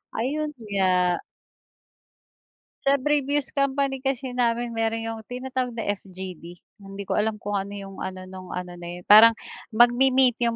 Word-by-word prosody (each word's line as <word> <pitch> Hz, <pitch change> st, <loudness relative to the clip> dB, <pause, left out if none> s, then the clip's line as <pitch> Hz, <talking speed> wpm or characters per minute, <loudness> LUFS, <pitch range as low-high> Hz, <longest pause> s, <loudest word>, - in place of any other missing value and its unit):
Ayun 295 Hz, +6 st, -1 dB
nga. 185 Hz, -3 st, +1 dB, 1.7 s
Sa 275 Hz, -, +6 dB
previous 290 Hz, -1 st, +1 dB
company 275 Hz, -1 st, 0 dB
kasi 265 Hz, -1 st, -2 dB
namin 240 Hz, -1 st, 0 dB
mayro'n 225 Hz, 0 st, -1 dB
'yong 225 Hz, 0 st, -4 dB
tinatawag 255 Hz, -1 st, -3 dB
na 225 Hz, -3 st, -1 dB
FGD. 185 Hz, -3 st, -9 dB, 0.2 s
Hindi 195 Hz, 0 st, -8 dB
ko 200 Hz, -, -1 dB
alam 220 Hz, +1 st, 0 dB
kung 205 Hz, -1 st, -3 dB
ano 200 Hz, +1 st, -6 dB
'yong 195 Hz, -1 st, -9 dB
ano, 185 Hz, 0 st, -5 dB
no'ng 185 Hz, 0 st, -9 dB
ano 180 Hz, 0 st, -5 dB
na 175 Hz, -, -8 dB
yun, 175 Hz, +1 st, -7 dB
parang 225 Hz, +3 st, +8 dB, 0.4 s
magmi-meet 250 Hz, +1 st, +5 dB
yung 230 Hz, -, 0 dB
225 Hz, 150 wpm, -25 LUFS, 195-260 Hz, 1.7 s, parang